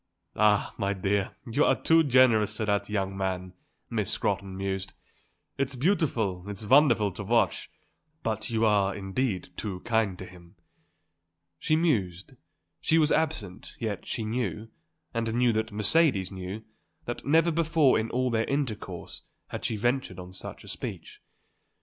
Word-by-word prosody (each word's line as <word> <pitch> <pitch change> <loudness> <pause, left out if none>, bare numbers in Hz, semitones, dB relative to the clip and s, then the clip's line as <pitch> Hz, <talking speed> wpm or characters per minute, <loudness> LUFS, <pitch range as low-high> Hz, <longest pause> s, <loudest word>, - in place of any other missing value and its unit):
"Ah, 105 -1 +3
my 100 0 +1
dear, 100 0 -1
you 120 +6 +1
are - - +3
too 165 0 +5
generous 120 -6 +4
to 110 - -1
that 100 0 0
young 95 -2 -1
man," 95 -1 -3 0.3
Miss - - -2
Scrotton 95 -1 -2
mused. 95 0 -3 0.7
"It's 135 0 0
beautiful, 125 - 0
it's 100 +1 -6
wonderful 120 -5 +5
to 100 - -6
watch; 115 +3 +1 0.5
but 110 -2 -2
you 115 -1 +1
are, 100 -2 +3
indeed, 100 0 -2
too 95 -4 -4
kind 110 -5 0
to 95 - -7
him." 90 -2 -15 1.0
She 155 - +2
mused, 105 - 0 0.5
she 160 - +2
was 155 -1 +3
absent, 105 - -1
yet 110 -3 -4
she 110 - -3
knew, 110 -2 -3 0.4
and 115 -1 -1
knew 120 -1 +3
that 110 +1 -1
Mercedes 105 - +2
knew, 95 +3 -6 0.4
that 120 - -5
never 165 +3 +4
before 160 -5 +3
in 110 +1 -2
all 125 +1 0
their 115 0 +1
intercourse 140 -6 -4 0.3
had - - -6
she 110 - -1
ventured 120 -3 0
on 90 0 -9
such 95 - -8
a - - -14
speech. - - -7
110 Hz, 150 wpm, -28 LUFS, 95-130 Hz, 1.0 s, too